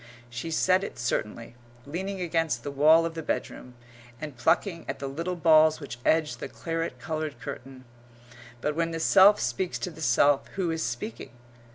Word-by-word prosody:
She 120 +7 -5
said 185 +4 +2
it - - -6
certainly, 115 -1 -3 0.3
leaning 190 +6 -4
against 165 -2 -1
the 145 - -4
wall 155 +4 +5
of 165 - -3
the 165 - -5
bedroom, 125 -4 -4 0.4
and 150 -3 -7
plucking 165 - +1
at 135 - -3
the 140 - -6
little 165 +7 -3
balls 155 -2 +5
which 140 -5 -8
edge 155 -6 +2
the - - -7
claret 165 -5 -4
coloured 155 0 -4
curtain. 130 +2 -9 0.8
But 150 +2 -1
when 165 0 0
the 165 0 -4
self 200 +5 +6
speaks 125 +9 -2
to 180 - -4
the 160 - -12
self, 140 +1 +3
who 185 -3 -1
is 160 0 -3
speaking? 120 0 -5
155 Hz, 175 wpm, -27 LUFS, 135-165 Hz, 0.8 s, self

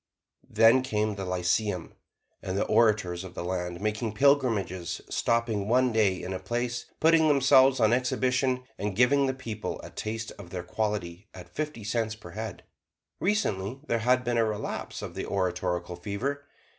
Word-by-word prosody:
Then 115 +4 +5
came 110 -4 -1
the 100 -1 -5
Lyceum, 90 +1 -1 0.5
and 95 +1 -3
the - - +1
orators 105 -6 +2
of 90 -1 -10
the - - -4
land 90 -1 -3
made 110 +1 -2
pilgrimages, 110 -10 +2
stopping 115 -4 0
one 125 +2 +3
day 105 -5 +2
in 95 - -4
a 95 - -3
place, 120 +5 -3
putting 160 0 +5
themselves 135 -2 +5
on 110 0 +4
exhibition, 130 +1 +1 0.2
and 100 -1 -2
giving 135 +4 +4
the 130 - 0
people 115 -5 -5
a - - -9
taste 110 +1 -4
of 85 - -10
their 90 0 -5
quality 105 -3 -3
at 90 -1 -12
fifty 150 -7 -4
cents 110 +1 -1
per 95 -5 -12
head. 110 +3 -6 0.6
Recently, 130 - 0
there 115 -5 0
has 125 +3 +3
been 120 -1 0
a - - +4
relapse 110 -1 -4
of - - -6
the - - -5
oratorical 90 -2 -1
fever. 125 +10 -4
110 Hz, 165 wpm, -28 LUFS, 95-125 Hz, 0.6 s, Then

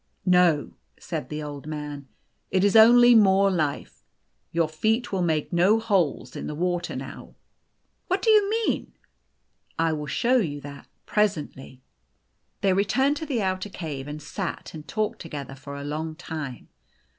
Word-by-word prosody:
" - - -44
No," 180 -5 +3 0.3
said 130 - -5
the 150 0 -4
Old 145 0 -7
Man: 150 -2 -6 0.2
" - - -47
it 185 0 +1
is 205 +1 +3
only 240 +2 +8
more 195 -3 +5
life. 155 -6 -2 0.5
Your 165 -1 +1
feet 220 +10 0
will 190 -2 0
make 160 -1 0
no 190 +6 +4
holes 185 - 0
in - - -5
the 150 - -5
water 175 +1 -2
now." - - -8 0.3
" - - -48
What 370 +2 -1
do 450 - +5
you 420 -2 +5
mean? 450 +1 -1 0.3
" - - -48
" - - -49
I 165 0 +1
will 150 -1 -4
show 245 - +2
you 155 -11 -1
that 140 -1 -10 0.2
presently." 150 -10 -2 0.8
They 195 -2 +3
returned 265 +9 +2
to 315 - -6
the 245 -7 -1
outer 185 +1 -2
cave, 150 -7 -6
and 150 +1 -6
sat 185 +3 -5
and 155 -1 -9
talked 215 -1 -2
together 145 -5 -7
for 140 +1 -9
a 140 - -6
long 155 +2 -4
time. 155 -6 -7
175 Hz, 175 wpm, -25 LUFS, 150-210 Hz, 0.8 s, only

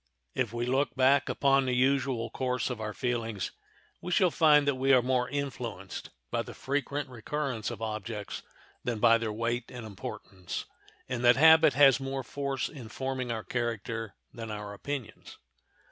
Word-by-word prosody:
If 120 -5 -1
we 120 0 -2
look 135 +3 +1
back 135 +1 +4
upon 135 -1 +3
the 125 - +1
usual 130 -3 +1
course 125 -1 -1
of 115 -3 -5
our 110 -1 -3
feelings 115 -4 -2 0.5
we 180 - -5
shall 180 -1 +4
find 150 -3 +5
that 140 - +4
we 135 +1 +1
are 130 - +7
more 125 -1 +1
influenced 125 -9 -5 0.2
by - - +1
the - - -9
frequent 145 +1 -2
recurrence 125 0 -3
of 115 -2 -6
objects 110 -1 -4 0.4
than 120 -2 -1
by 115 +2 +5
their 115 -1 -2
weight 115 +2 -2
and 120 -2 -8
importance, 95 -3 -6 0.4
and 125 -1 -3
that 120 0 +7
habit 160 +1 +7
has 135 -3 +7
more 135 0 -3
force 140 0 -2
in 125 -7 -10
forming 130 -1 -3
our 110 -1 -3
character 115 -2 -3 0.2
than 115 -1 -7
our 105 -1 -5
opinions. 125 0 -6
125 Hz, 165 wpm, -29 LUFS, 115-135 Hz, 0.5 s, are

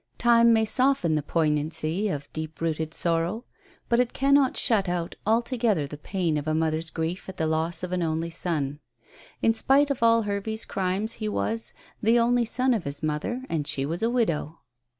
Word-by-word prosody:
Time 235 -1 +5
may 220 -1 +4
soften 255 -8 +2
the 155 - +1
poignancy 155 +5 0
of 145 -5 -4
deep 155 0 -6
rooted 160 -1 -2
sorrow, 170 +8 -1 0.4
but 235 - +2
it 250 -1 +1
cannot 275 -1 +3
shut 200 -5 +2
out 175 -1 -2
altogether 230 - +1
the 145 - -8
pain 165 +1 -2
of 150 +1 -4
a 155 - +1
mother's 160 0 0
grief 165 +5 -4
at 190 - -9
the 160 - 0
loss 160 +3 -1
of 180 - -4
an 180 -1 -1
only 165 0 -1
son. 150 -5 -2 0.6
In 225 - +4
spite 280 +5 +3
of 270 - -3
all 230 0 +4
Hervey's 210 +2 -3
crimes 195 +4 -1
he 215 - -1
was 225 +2 -3 0.3
"the 225 +2 +4
only 240 0 +3
son 255 +3 +1
of 215 -6 -1
his 140 +2 -5
mother, 155 +12 -2
and 150 -3 -2
she 135 - -1
was 165 +4 -3
a 225 - +2
widow." 170 -10 -1
180 Hz, 190 wpm, -26 LUFS, 160-230 Hz, 0.6 s, Time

